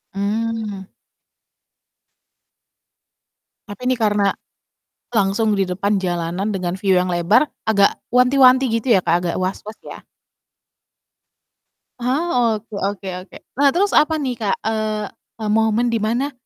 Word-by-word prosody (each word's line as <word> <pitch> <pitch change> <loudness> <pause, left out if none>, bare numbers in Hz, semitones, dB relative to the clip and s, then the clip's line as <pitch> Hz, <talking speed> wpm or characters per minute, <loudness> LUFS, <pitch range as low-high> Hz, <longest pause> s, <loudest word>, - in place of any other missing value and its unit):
Mmm. 210 -1 -3 2.8
Tapi 205 +4 -10
ini 255 - +2
karena 205 -2 +2 0.8
langsung 210 -1 +1
di 195 - +2
depan 200 +3 -1
jalanan 180 +2 -2
dengan 185 -2 -3
view 195 0 0
yang 180 - -1
lebar 175 - +2 0.2
agak 200 -2 +3 0.2
wanti-wanti 255 +1 +5
gitu 230 +1 +1
ya, 190 - +4
Kak, 170 - +1
agak 170 - -1
was-was 195 +4 -4
ya? - - -11 2.0
Ah, 250 -3 +1
oke 215 +2 -11
oke 195 0 -3
oke. 185 - -13 0.2
Nah 285 - +5
terus 400 +3 +2
apa 315 +1 +3
nih, 280 -5 -2
Kak, 210 -3 0
eee 215 -1 -1 0.4
eee, 210 - -2
momen 225 +2 +2
di 230 - 0
mana, 240 +7 -1
215 Hz, 125 wpm, -20 LUFS, 195-240 Hz, 2.8 s, wanti-wanti